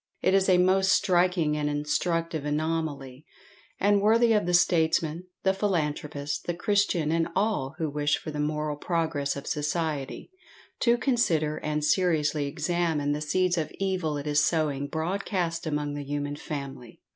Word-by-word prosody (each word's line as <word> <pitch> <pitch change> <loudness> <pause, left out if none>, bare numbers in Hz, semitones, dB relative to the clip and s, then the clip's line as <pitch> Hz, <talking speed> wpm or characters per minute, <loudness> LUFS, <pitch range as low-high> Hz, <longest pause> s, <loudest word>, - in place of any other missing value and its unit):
It 185 - +3
is 195 0 +3
a 185 - +6
most 190 +1 +3
striking 175 -4 +2
and 150 -1 -1
instructive 155 +2 -1
anomaly, 150 -3 -3 0.6
and 205 0 +3
worthy 225 +2 +4
of 210 -4 +1
the 180 - 0
statesman, 165 0 +2 0.2
the 190 - +3
philanthropist, 150 -7 -2
the 175 - -1
Christian, 190 -5 +1
and 165 0 +1
all 190 -9 0
who 160 - -1
wish 145 0 0
for 155 - -7
the 150 - -5
moral 150 0 -1
progress 160 -4 -1
of 140 - -7
society, 150 - -3 0.5
to 235 -1 +3
consider 170 - +1
and 150 0 -2
seriously 150 -4 +1
examine 155 -1 -1
the 150 +1 -2
seeds 180 +3 +1
of 155 - -3
evil 185 -6 -1
it 145 - -6
is 150 0 +2
sowing 145 -4 0
broadcast 170 +1 -2
among 150 -1 -2
the 145 0 -5
human 145 0 -3
family. 140 -6 -7
160 Hz, 155 wpm, -27 LUFS, 150-180 Hz, 0.6 s, a